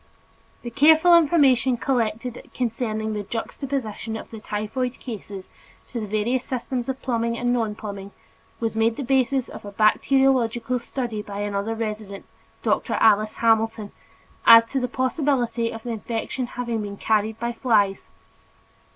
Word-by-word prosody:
The 240 - -6
careful 315 +6 +6
information 275 -7 +4
collected 235 -1 -2
concerning 220 -3 -2
the 210 - -2
juxtaposition 225 0 -4
of - - -10
the 225 - -8
typhoid 215 +5 -3
cases 205 -5 -8 0.4
to 240 - -3
the 215 - -4
various 220 +5 0
systems 255 0 -3
of 265 0 -3
plumbing 235 -2 -1
and 245 0 +1
nonplumbing 210 -3 -4 0.5
was 225 -1 -2
made 225 +1 +2
the 280 - -4
basis 265 0 +1
of - - -10
a 205 - -8
bacteriological 245 +2 +2
study 240 -3 -4
by 205 -1 -6
another 205 +2 -2
resident, 215 -3 -5 0.4
Dr. - - 0
Alice 215 -1 +3
Hamilton, 225 -2 +1 0.6
as 230 0 +10
to 270 - 0
the 250 - -1
possibility 250 -2 0
of 225 -1 -8
the 245 - -6
infection 230 +3 -3
having 235 -3 -2
been 200 -1 -6
carried 220 +1 0
by 235 0 -2
flies. 210 -6 +1
230 Hz, 140 wpm, -23 LUFS, 215-255 Hz, 0.6 s, as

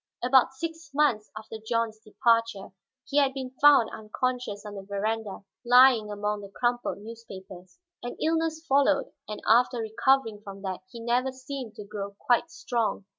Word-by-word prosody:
About 260 +1 +4
six 325 +1 -6
months 265 -8 +2
after 220 +1 -8
John's 220 0 -2
departure, 230 -3 0 0.3
he 280 - -3
had 275 -1 +2
been 260 -2 -5
found 290 -5 +6
unconscious 220 0 -3
on 210 - -7
the 200 - -7
veranda, 200 +1 -3 0.2
lying 245 -3 +6
among 210 0 -2
the 200 - -10
crumpled 240 +4 -1
newspapers. 195 -4 -11 0.2
An 245 - -6
illness 320 0 0
followed, 280 0 +2 0.2
and 210 - -7
after 245 +3 +4
recovering 225 0 +1
from 195 -1 -10
that 190 -2 -3
he 235 - -10
never 245 +3 0
seemed 260 -3 -7
to 210 - -8
grow 200 -1 -6
quite 245 +3 +1
strong. 230 -4 -2
230 Hz, 155 wpm, -27 LUFS, 210-260 Hz, 0.3 s, found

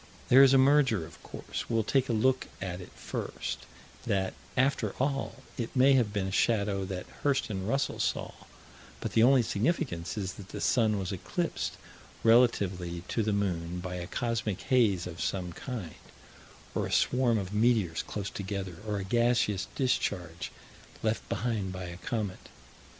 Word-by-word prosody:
There 130 +2 +9
is 135 -1 +8
a 135 - +6
merger, 130 - +4
of 85 - -14
course. - - -6
We'll 115 -1 +2
take 130 +4 +1
a - - +2
look 130 +4 +2
at 90 -1 -4
it 90 - -11
first - - -5 0.4
that, 95 -1 +1 0.2
after 135 +2 +2
all, 135 0 -1 0.2
it 115 +2 -3
may 135 +2 +6
have 120 -6 +3
been 100 -2 -1
a 95 - -3
shadow 100 -2 +1
that 95 -1 -5 0.2
Hirst 135 -6 +1
and 95 0 -3
Russell 135 +3 0
saw, - - -1 0.7
but - - -3
the 110 - +4
only 130 +1 +6
significance 110 - -1
is 95 -3 -2
that 100 -1 -11
the - - -6
sun 110 -4 +3
was 95 -2 -3
eclipsed 95 - -2 0.5
relatively 100 -7 +3
to 115 - 0
the 110 0 +1
moon 90 -4 -1
by 90 0 -5
a 90 0 -5
cosmic 115 -4 -2
haze 105 -9 +3
of 85 -2 -6
some 90 -3 -2
kind, 110 - -6 0.8
or - - -1
a - - -7
swarm 125 -2 +3
of 100 -1 -4
meteors 105 -7 +2
close 100 -1 -5
together, 95 -3 -4
or 105 -1 -1
a 100 - -3
gaseous 115 -2 +2
discharge 90 - -1 0.5
left 110 0 -1
behind 110 -5 -1
by 95 0 -5
a 85 -1 -7
comet. 100 +1 -4
105 Hz, 165 wpm, -30 LUFS, 95-120 Hz, 0.8 s, There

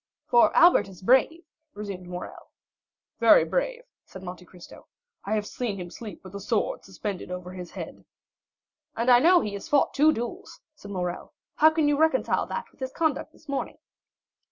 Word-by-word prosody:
"For 240 -1 +5
Albert 335 - +6
is 190 -1 -14
brave," 265 - +3 0.3
resumed 200 -3 -7
Morrel. 180 0 -8 0.7
"Very - - +6
brave," - - -2 0.2
said 190 - -12
Monte 180 0 -8
Cristo; 180 -1 -15 0.4
"I 210 +2 0
have 210 -1 -1
seen 220 -2 -4
him 175 -2 -7
sleep 215 -6 -9
with 185 0 -12
a 200 - -5
sword 205 +2 -1
suspended 195 0 -6
over 180 0 -6
his 180 -1 -8
head." - - -9 0.9
"And 235 +2 +3
I 240 - +8
know 350 +6 +5
he 210 - -4
has 200 - -7
fought 290 - +3
two 300 +2 +5
duels," 240 -3 -6
said 205 -9 -13
Morrel. 180 +5 -4 0.2
"How 315 - +7
can 315 -1 +1
you 290 -1 +2
reconcile 320 0 +2
that - - -5
with - - -29
his 260 -1 -4
conduct 315 -1 -1
this 310 - -23
morning?" 280 -1 -3
215 Hz, 180 wpm, -26 LUFS, 185-295 Hz, 0.9 s, I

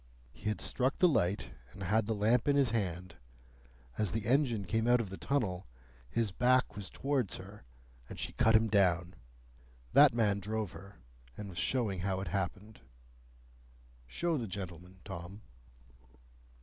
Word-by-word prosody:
He 105 - -4
had 105 - -2
struck 130 +1 0
the 185 - +5
light, 95 - 0 0.2
and 95 - -8
had 105 +3 +1
the 110 - 0
lamp 115 +5 +2
in 145 - +4
his 135 -5 +3
hand. 90 -5 -3 0.8
As 105 -3 +1
the 110 -2 -2
engine 120 -4 +2
came 110 +5 0
out 120 0 +5
of 105 -5 -4
the - - -5
tunnel, 100 -10 -1 0.4
his 115 -3 0
back 125 +5 +2
was 100 -3 -6
towards 135 -6 -1
her, 100 -3 -11 0.4
and - - -8
she - - -3
cut 110 0 +4
him 110 +1 +5
down. 90 -4 +2 0.8
That - - +8
man 105 -4 +2
drove 105 0 -3
her, 100 +1 -12 0.4
and 105 -1 -6
was 90 - -6
showing 110 -8 0
how 95 +1 -1
it 95 -2 -4
happened. 100 +4 -4 1.3
Show 165 - -1
the 115 - -4
gentleman, 90 -1 -8
Tom." 95 +2 -8
105 Hz, 160 wpm, -32 LUFS, 95-115 Hz, 1.3 s, That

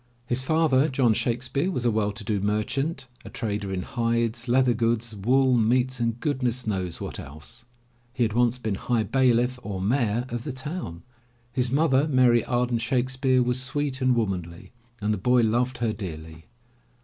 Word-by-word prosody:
His 120 +1 -1
father, 155 -1 +3
John 130 -4 +3
Shakes 120 +3 -1
peare, 145 +8 0
was 125 -10 -2
a 120 - +4
well 105 -1 0
to 105 +2 -8
do 105 0 -1
merchant, 135 - -1 0.2
a - - -9
trader 105 -4 -3
in 90 -1 -2
hides, 115 0 -1
leather 125 0 +3
goods, 115 0 -1
wool, 130 +6 +3
meats 125 +3 +2
and 115 0 -1
goodness 125 -4 -1
knows 95 -5 -2
what - - -6
else. 75 - -8 0.5
He 125 0 0
had 110 -2 0
once 120 +1 +2
been 110 -4 -2
High 115 +3 0
Bailiff 125 +1 +2
or 100 -5 -5
Mayor 115 +2 +1
of 120 0 -4
the 145 - -4
town. 130 - -6 0.5
His 125 -1 0
mother, 145 0 +3
Mary 125 -5 +4
Arden 120 -1 0
Shakespeare, 130 +1 +1
was 125 +1 0
sweet 135 +1 -2
and 130 -1 +3
womanly, 90 -7 -3 0.3
and 105 0 0
the 105 - -3
boy 125 +5 +3
loved 120 +3 +1
her 115 -2 0
dearly. 80 -5 -8
120 Hz, 175 wpm, -25 LUFS, 110-130 Hz, 0.5 s, a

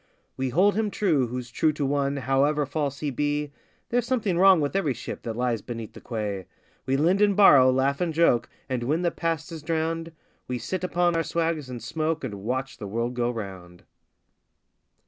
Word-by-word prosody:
We 130 0 -2
hold 190 +10 +4
him 215 0 0
true 160 -11 +1
who's 125 0 -6
true 155 - +2
to 145 -1 -2
one 140 0 0
however 140 +3 +1
false 140 -1 -3
he 150 -2 -1
be 145 +2 -1 0.4
(There's 240 0 0
something 225 -8 0
wrong 190 -2 +7
with 145 +3 -1
every 155 -10 +1
ship - - -7
that 115 -1 -5
lies 120 -2 0
beside 115 -2 -7
the - - -12
quay); 105 -5 -4 0.4
We 135 +1 +2
lend 175 +7 +3
and 205 -1 +4
borrow, 140 -10 +8
laugh 135 +3 +1
and 175 -2 +1
joke, 160 -7 +3 0.2
and 130 -2 -2
when 150 +8 0
the 170 - +2
past 165 -1 -2
is 160 -2 -7
drowned, 165 +1 -2 0.4
We 125 - -2
sit 170 +11 -4
upon 175 -1 +1
our 165 - +2
swags 165 -4 -1
and 120 -3 -7
smoke 155 +5 -2
and 105 -6 -5
watch 130 +4 -3
the 105 - -5
world 115 +4 -2
go 120 -1 0
round. 95 -6 -7
145 Hz, 195 wpm, -26 LUFS, 125-165 Hz, 0.4 s, borrow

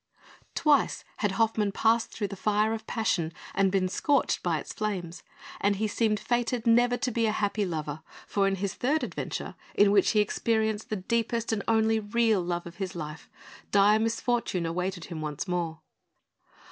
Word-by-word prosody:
Twice 300 -4 +2
had 205 -3 0
Hoffmann 215 -1 +1
passed 225 +3 +2
through 205 -3 -3
the 200 - -6
fire 210 +3 +1
of 225 - -6
passion 180 -8 0 0.2
and 195 -1 +2
been 190 -1 +2
scorched 285 +10 +1
by - - 0
its - - -7
flames; 185 -6 -3 0.4
and 200 0 +2
he 215 +2 0
seemed 215 0 +1
fated 240 0 -1
never 245 +1 +4
to 250 0 -1
be 230 0 +1
a - - +2
happy 205 -1 0
lover, 155 -3 -4 0.2
for 200 -1 +1
in 195 - +1
his 195 0 -2
third 295 +5 0
adventure - - -4 0.2
in 205 0 +5
which 200 -2 +4
he 215 - +3
experienced 220 +1 0
the 215 - -1
deepest 230 +3 -1
and 210 - -1
only 220 0 +3
real 220 -1 +2
love 175 0 -3
of 170 0 -10
his 190 -1 -4
life 150 -2 -7 0.4
dire 205 +1 +5
misfortune 225 -5 0
awaited 180 +1 -2
him 165 -3 -6
once 150 +3 -4
more. 170 -3 -2
210 Hz, 175 wpm, -28 LUFS, 185-225 Hz, 0.4 s, in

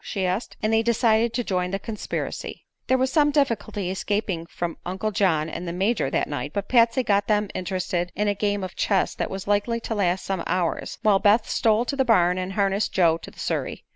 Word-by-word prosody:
she 195 -2 -2
asked. 185 +6 -2
And 215 +1 +1
they 225 - +4
decided 230 0 +2
to 245 - 0
join 180 -4 -1
the 195 - -1
conspiracy. 215 +1 -5 0.2
There 260 - +3
was 260 +1 +1
some 295 -2 +4
difficulty 230 -9 0
escaping 190 -3 -2
from 170 -1 -4
Uncle 190 +4 -3
John 165 -7 +2
and 170 +2 -6
the 170 - -3
Major 195 - 0
that - - 0
night, 145 0 -4
but 200 0 -2
Patsy 235 +1 +4
got 200 -2 +1
them 210 -1 +1
interested 180 -1 -2
in 210 +2 0
a 205 - +2
game 205 0 -1
of 185 - -6
chess 195 -3 +1
that - - -3
was 195 0 -5
likely 205 +3 +1
to 225 - -3
last 185 -3 0
some 190 -2 -2
hours, 180 -2 -1
while 205 -3 +4
Beth 210 +3 +4
stole 225 +1 +2
to 280 - -2
the 270 - +2
barn 180 -7 +3
and 185 +1 -4
harnessed 200 +1 +1
Joe 165 -3 +3
to - - -10
the - - -20
surrey. - - -3
200 Hz, 220 wpm, -24 LUFS, 185-225 Hz, 0.2 s, they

